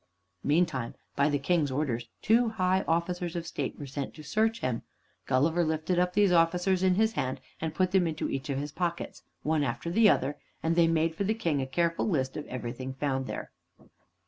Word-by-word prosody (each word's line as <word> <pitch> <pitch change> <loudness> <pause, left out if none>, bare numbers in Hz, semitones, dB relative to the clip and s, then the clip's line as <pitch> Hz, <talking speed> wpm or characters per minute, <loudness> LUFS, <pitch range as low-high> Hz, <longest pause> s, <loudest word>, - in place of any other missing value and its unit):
Meantime, 145 -6 +1 0.2
by 140 +1 +3
the 145 - +2
King's 150 +1 +1
orders, 130 -4 -1 0.2
two 230 +2 +4
high 190 -3 +1
officers 170 +1 -1
of 170 -1 -3
state 165 - -4
were 145 - -6
sent 140 0 -5
to 155 - -10
search 220 +6 +1
him, 120 -3 -1 0.5
Gulliver 160 +7 +3
lifted 160 +3 0
up 180 0 +1
these 205 -2 +4
officers 180 +2 +3
in 185 -1 +4
his 220 +2 +2
hand 130 -5 -2 0.2
and 160 -1 -3
put 185 +2 +2
them 185 -3 +3
into 160 -1 -2
each 135 +2 -4
of 135 - -1
his 145 +1 -3
pockets, 170 +2 -3 0.2
one 155 -1 +1
after 130 +5 -2
the 215 +3 +6
other, 140 -2 +1 0.2
and 165 +1 +1
they 170 -1 +5
made 165 0 +2
for 180 - -2
the 215 +3 +1
King 165 -10 0
a 130 - -3
careful 170 +7 0
list 130 -7 0
of 150 - -5
everything 130 +1 -5
found 135 -1 -1
there. - - -5
165 Hz, 200 wpm, -29 LUFS, 140-180 Hz, 0.5 s, the